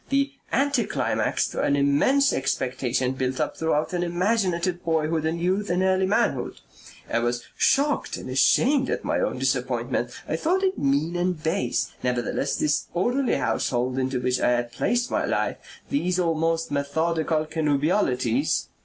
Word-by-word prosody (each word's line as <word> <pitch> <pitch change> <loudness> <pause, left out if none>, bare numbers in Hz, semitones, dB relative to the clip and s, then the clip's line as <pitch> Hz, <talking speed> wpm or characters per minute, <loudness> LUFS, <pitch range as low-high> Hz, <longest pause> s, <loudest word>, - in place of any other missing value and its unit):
The 275 0 +1 0.2
anti 285 +1 +2
climax - - 0
to - - -3
an 140 - +2
immense 145 - +3
expectation 130 -1 -1
built 130 0 -2
up 155 - -1
throughout 160 +1 0
an 175 - 0
imaginative 180 -1 0
boyhood 160 -1 0
and 165 +1 -2
youth 190 +4 0
and 180 +1 +1
early 190 0 +2
manhood. 195 - 0 0.5
I 115 - 0
was 120 0 -1
shocked 285 +1 +1
and - - -8
ashamed 260 - +3
at - - -2
my - - 0
own - - -1
disappointment. - - -1 0.2
I - - -1
thought 365 +4 +1
it 380 0 0
mean 145 +5 +1
and 175 -2 -1
base. 165 +5 -1
Nevertheless 125 +2 -1
this 150 -1 0
orderly 245 +9 +1
household 125 +2 -1
into 130 0 -1
which 125 0 0
I - - +2
had 120 -1 0
placed 240 - 0
my - - +1
life, - - -1 0.3
these 180 -11 0
almost 165 -2 0
methodical 155 +2 0
connubialities...." 155 - 0
165 Hz, 155 wpm, -25 LUFS, 135-190 Hz, 0.5 s, immense